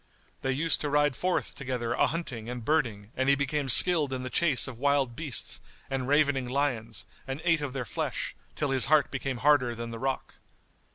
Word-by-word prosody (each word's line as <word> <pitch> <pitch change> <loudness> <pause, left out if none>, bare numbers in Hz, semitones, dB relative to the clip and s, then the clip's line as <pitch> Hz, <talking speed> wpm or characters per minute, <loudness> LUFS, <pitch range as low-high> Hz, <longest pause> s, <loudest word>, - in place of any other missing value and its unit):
They 135 - 0
used 155 +5 +1
to 150 - -1
ride 145 -1 +2
forth 180 +5 -1
together 125 -4 -3
a - - +2
hunting 125 -7 -5
and 125 -2 -6
birding 115 -9 0
and 130 +1 +1
he 140 - +6
became 140 0 -1
skilled 155 +1 +6
in 130 -1 -3
the 130 - -5
chase 155 -8 +4
of 125 -4 -8
wild 140 -3 +1
beasts 145 -3 -2 0.3
and 130 -1 -2
ravening 140 -3 +2
lions 120 -6 -2 0.2
and 135 +1 -4
ate 165 -3 +2
of 140 -3 -4
their 135 -3 -3
flesh, - - -3 0.2
till 145 -2 -1
his 130 -2 +2
heart 155 -1 +3
became 135 -1 -3
harder 130 -5 +4
than 115 0 -6
the 115 - -7
rock. 135 +1 -3
135 Hz, 195 wpm, -28 LUFS, 125-145 Hz, 0.3 s, he